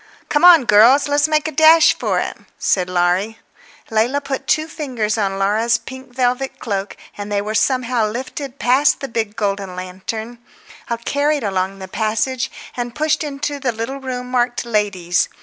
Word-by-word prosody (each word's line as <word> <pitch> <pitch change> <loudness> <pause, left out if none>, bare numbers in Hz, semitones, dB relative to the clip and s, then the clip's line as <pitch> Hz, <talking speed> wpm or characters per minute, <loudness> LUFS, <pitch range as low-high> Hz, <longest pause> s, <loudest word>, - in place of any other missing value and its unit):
"Come 295 - +1
on, 340 -7 +8
girls, 235 +8 +6
let's 290 +1 +2
make 305 0 +1
a - - -3
dash 315 +2 +6
for - - -2
it," - - -3 0.2
said 180 -2 0
Laurie. 180 +5 0 0.5
Leila 230 +6 +1
put 275 -2 -5
two 310 +1 +1
fingers 250 -10 -3
on 195 -3 -1
Laura's 220 +4 +2
pink 260 0 -11
velvet 255 +1 0
cloak, 200 -3 -4 0.2
and 205 0 -6
they 205 - +1
were 210 +2 -3
somehow 250 -1 +1
lifted 260 +4 -6
past 265 +4 +3
the 275 - -5
big 225 -3 -3
golden 200 -4 -2
lantern, 205 +6 -6 0.7
carried 290 -1 0
along 190 -1 -1
the 190 -1 -8
passage, 225 +5 -1 0.3
and 240 -1 -4
pushed 310 0 0
into 290 0 -4
the 265 -3 0
little 230 +4 -5
room 250 -2 -5
marked 245 -1 0
"Ladies." 200 -6 0
240 Hz, 165 wpm, -19 LUFS, 205-275 Hz, 0.7 s, on